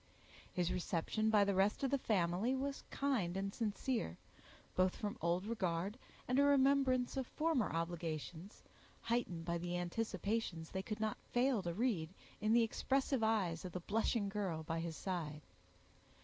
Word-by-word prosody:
His 180 -2 0
reception 180 +5 0
by 210 -2 +6
the 200 0 +2
rest 195 +6 +2
of 270 - +1
the 280 - +4
family 195 +3 +1
was 275 +1 -3
kind 225 -11 0
and 195 0 -2
sincere, 220 - -1 0.6
both 185 0 +3
from 205 -1 -3
old 170 +3 +1
regard, 195 0 -1 0.3
and 255 +2 +3
a - - +6
remembrance 270 -2 +4
of 265 -2 -1
former 305 - +1
obligations, 165 +2 -4 0.4
heightened 230 -8 -1
by 170 0 -1
the 175 +1 -2
anticipations 190 -2 -2
they 190 - -2
could 215 +3 -4
not 215 -1 -1
fail 245 -2 +2
to 175 -2 -2
read 210 -9 +1 0.3
in 215 +1 +1
the 235 0 +6
expressive 265 +3 +1
eyes 195 -7 +1
of 180 -2 -6
the 180 - -2
blushing 210 +3 +1
girl 195 -6 -2
by 165 +1 -2
his 165 -1 -4
side. 155 -6 -3
200 Hz, 160 wpm, -37 LUFS, 175-235 Hz, 0.6 s, by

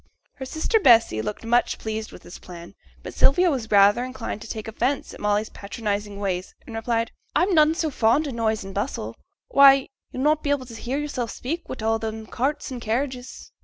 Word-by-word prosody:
Her 265 - -6
sister 315 - 0
Bessy 230 - +5
looked 110 - -5
much 240 +2 +2
pleased 220 0 -5
with - - -13
this 175 - -11
plan, 175 0 -11 0.3
but - - -7
Sylvia 350 +6 +4
was 245 -6 -3
rather 205 +3 +5
inclined 255 -4 -5
to 225 - -9
take 220 -1 -5
offence 250 +5 -2
at - - -11
Molly's 210 +1 0
patronizing 205 -1 -4
ways, 185 -2 -3
and 230 - -10
replied, 230 0 -1 0.2
'I'm 375 +2 +3
none 310 -1 +5
so 320 -3 -1
fond 250 +5 +2
o' - - -4
noise 220 -3 -1
and 195 0 -8
bustle; 205 +8 -3 0.3
why, 275 - +6 0.2
yo'll 255 - -3
not 305 +1 +3
be 285 - -3
able 285 -3 0
to 240 - -11
hear 245 +4 -4
yoursels 285 -5 -3
speak 330 +7 -5
wi' 225 -4 -5
all 225 0 +2
them 220 0 -5
carts 280 +6 -2
and 250 -2 -6
carriages. 250 +3 -4
235 Hz, 200 wpm, -24 LUFS, 215-275 Hz, 0.3 s, why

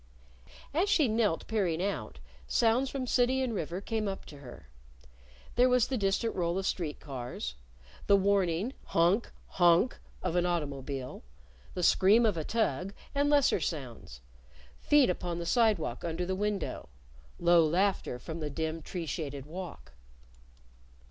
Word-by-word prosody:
As 355 +7 +1
she 305 -8 +4
knelt, 215 -6 +1
peering 190 -7 0
out, 180 - -3 0.3
sounds 240 +4 +2
from 270 -2 -3
city 255 +1 +2
and 245 -3 -2
river 175 -2 -3
came 220 0 -2
up 195 -1 -5
to 145 - -12
her. 120 - -12 0.9
There 250 +1 +4
was 250 -2 +3
the 265 - -1
distant 200 +3 0
roll 175 -1 0
of 195 - -2
street 160 -7 -2
cars, 125 - -6 0.5
the 200 - +6
warning; 195 +2 +1
honk! 175 +7 +2
honk! 175 +6 +3 0.2
of 165 - -1
an 175 - +3
automobile, 140 -5 -3 0.5
the 180 - -2
scream 210 +7 +5
of 210 -4 +2
a 160 - -2
tug; 195 - -1 0.2
and 285 0 +2
lesser 290 -2 +4
sounds 120 - -5 0.6
feet 295 -3 +4
upon 175 -1 -2
the 170 - -4
sidewalk 200 - +1
under 170 +1 -2
the 190 - -2
window, 205 -1 -3 0.5
low 170 -1 +5
laughter 180 -4 +1
from 160 +6 -7
the 150 -2 -3
dim, 160 +2 -3
tree 170 +2 -5
shaded 140 -4 -4
walk. 170 - -8
180 Hz, 150 wpm, -30 LUFS, 160-220 Hz, 0.9 s, the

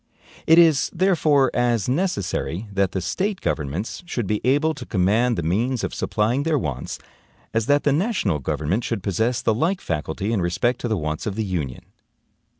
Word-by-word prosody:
It 160 - +7
is, 165 -5 +5
therefore, 160 -7 +3
as 120 -4 +1
necessary 115 - -1
that 100 -2 +1
the 95 - -2
State 190 - -2
governments 75 +8 -3
should 120 - -2
be 105 +2 -1
able 145 +6 +2
to 125 - -8
command 110 +5 +2
the 85 - -1
means 115 +9 0
of - - -2
supplying 115 +5 0
their 155 0 +1
wants, 70 - -4 0.6
as 115 -1 0
that 145 0 +3
the 145 - +3
national 155 - 0
government 75 - -1
should 110 -5 -3
possess 110 +6 0
the 110 - +3
like 165 - 0
faculty 85 +7 -3
in 100 - +1
respect 105 +8 0
to - - -1
the 110 -2 0
wants 75 +1 -3
of 100 - -2
the 110 0 -1
Union. 80 -10 -3
115 Hz, 180 wpm, -23 LUFS, 95-140 Hz, 0.6 s, It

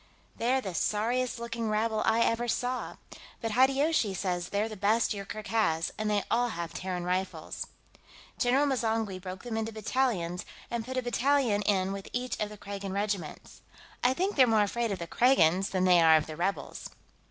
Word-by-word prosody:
They're 255 +3 +1
the 190 -6 -5
sorriest 230 +8 0
looking 230 -1 -3
rabble 215 0 0
I 225 +1 +3
ever 230 +1 +1
saw, 250 +2 -2 0.4
but 225 -2 -3
Hideyoshi 265 -2 +3
says 180 -2 -2
they're 205 +2 0
the 215 - -7
best 215 +4 +2
Yoorkerk 205 +1 -6
has, 165 -8 +1
and 215 0 -2
they 205 -1 +1
all 245 +1 +2
have 170 -5 -5
Terran 180 -1 -3
style - - -5
rifles. 190 - -7 0.7
General 260 +4 +3
M'zangwe 225 -7 -1
broke 185 0 -7
them 235 -2 -4
into 225 0 -2
battalions, 215 -6 -1 0.3
and 235 -1 -2
put 260 +3 -5
a 255 - 0
battalion 245 -3 +2
in 190 -2 +2
with 195 0 -6
each 250 0 -2
of 210 - -1
the 210 - -10
Kragan 200 -1 -6
regiments. 200 -5 -4 0.4
I 255 +1 +3
think 385 +6 0
they're 260 -3 +6
more 220 -2 +4
afraid 230 +2 -1
of 195 - -2
the 170 - -5
Kragans 190 -4 +3
than 185 -1 0
they 180 -2 +6
are 160 -1 +7
of 155 - -1
the 155 - -7
rebels." 175 -2 -3
215 Hz, 185 wpm, -29 LUFS, 190-240 Hz, 0.7 s, are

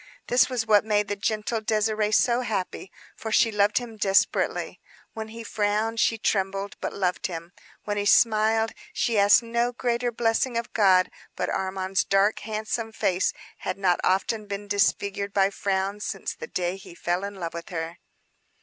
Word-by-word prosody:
This 245 +2 +4
was 245 -3 -1
what 210 -2 +5
made 210 -1 +1
the 205 - -1
gentle 215 +2 -1
Désirée 215 -1 +1
so 235 +3 +3
happy, 195 -5 -3 0.2
for 220 - -6
she 225 +1 +4
loved 210 0 +2
him 235 -3 -3
desperately. 195 -1 +1 0.3
When 220 -1 -5
he 230 +1 -9
frowned 215 +1 -1
she 225 - +2
trembled, 195 -1 -1
but - - -2
loved 180 -2 -1
him. 170 -1 -7 0.3
When 205 0 -2
he 205 - -1
smiled, 220 0 +4 0.2
she 230 -3 +1
asked 200 +3 +6
no 235 +1 0
greater 245 0 -1
blessing 230 +1 0
of 235 - -4
God. 190 -4 +4 0.2
But - - -2
Armand's 190 0 -1
dark, 195 +2 +2
handsome 220 +1 -3
face 185 -4 +1 0.3
had 185 - -3
not 185 -3 +2
often 205 +3 0
been 200 +1 -5
disfigured 200 0 0
by 195 0 +3
frowns 200 +1 -2
since - - -4
the 480 - -8
day 180 - -2
he 180 -3 -13
fell 175 +2 -1
in 200 0 -5
love 170 -3 -5
with 170 0 -7
her. 165 -1 -5
205 Hz, 170 wpm, -25 LUFS, 195-225 Hz, 0.3 s, asked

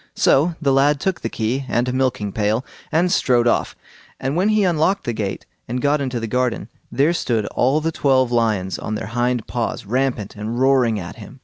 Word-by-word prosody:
So 160 +5 +3
the 140 -4 +2
lad 140 +2 +3
took 190 +4 -1
the 115 - -2
key 120 +5 -2
and 120 +1 +1
a 125 - -1
milking 120 -6 0
pail, 110 +5 0 0.3
and 175 +3 +2
strode 120 -7 +3
off; - - +1 0.4
and 135 +3 -2
when 190 +5 +2
he 215 -1 +3
unlocked 180 +2 +1
the 120 - -2
gate 100 -3 -4 0.2
and 125 +2 -2
got 145 +2 +1
into 130 -3 -2
the 115 - -3
garden, 125 -1 -1 0.2
there 145 +5 +2
stood 115 -10 -1
all 135 +5 +2
the 165 +1 -1
twelve 130 -5 +2
lions 110 -6 0
on 110 - -4
their 105 - -5
hind 120 -1 0
paws, 120 -4 -3
rampant 120 -2 -1
and 110 +3 -4
roaring 130 -5 +3
at 90 +3 -8
him. 120 +4 -12
125 Hz, 205 wpm, -20 LUFS, 115-140 Hz, 0.4 s, So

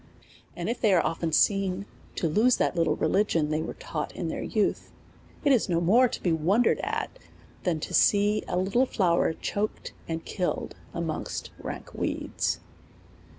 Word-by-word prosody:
And - - -4
if 240 - -2
they 215 -4 +4
are 170 - +3
often 165 0 -1
seen 195 +2 +2 0.3
to 170 - 0
lose 225 +10 +3
that - - +1
little 165 -3 +2
religion 165 -7 +1
they 155 +1 0
were 165 - -5
taught 150 -2 -4
in 170 - -3
their - - -3
youth, 215 -2 -1 0.5
it 285 - +5
is 245 -7 +3
no 170 -1 +2
more 220 +9 +5
to - - -6
be 175 - +2
wondered 180 +9 +3
at, - - -3 0.5
than 170 -4 +1
to - - -5
see 205 +1 +4
a 175 - -1
little 200 +8 +2
flower 170 -6 +2
choked 205 +5 -3
and 165 0 -4
killed 180 -2 -2 0.2
amongst 165 -2 -4
rank - - -7
weeds. - - -2
180 Hz, 165 wpm, -27 LUFS, 165-210 Hz, 0.5 s, it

